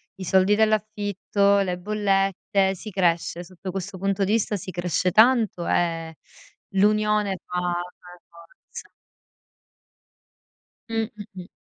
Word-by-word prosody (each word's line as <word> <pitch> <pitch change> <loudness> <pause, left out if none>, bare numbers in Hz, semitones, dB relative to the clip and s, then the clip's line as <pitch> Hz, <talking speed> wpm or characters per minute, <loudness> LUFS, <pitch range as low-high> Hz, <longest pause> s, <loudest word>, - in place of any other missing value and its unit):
i 190 - -8
soldi 190 +3 +3
dell'affitto, 205 -2 +1
le 180 -2 -1
bollette. 195 -1 0
Si 215 +4 -9
cresce, 175 -2 0
sotto 185 +1 -8
questo 195 +1 -6
punto 195 +1 0
di 205 - 0
vista 220 -1 +1
si 185 0 -8
cresce 180 +1 -1
tanto 220 -4 +4
e 165 -2 -1 0.6
l'unione 210 -1 +2
fa 180 0 -3
fa 175 0 -4
la 180 - -15
forza. 170 0 -14 2.0
Mh 225 -1 -1
Mh-mh. 195 -3 -10
195 Hz, 120 wpm, -24 LUFS, 180-210 Hz, 2.0 s, tanto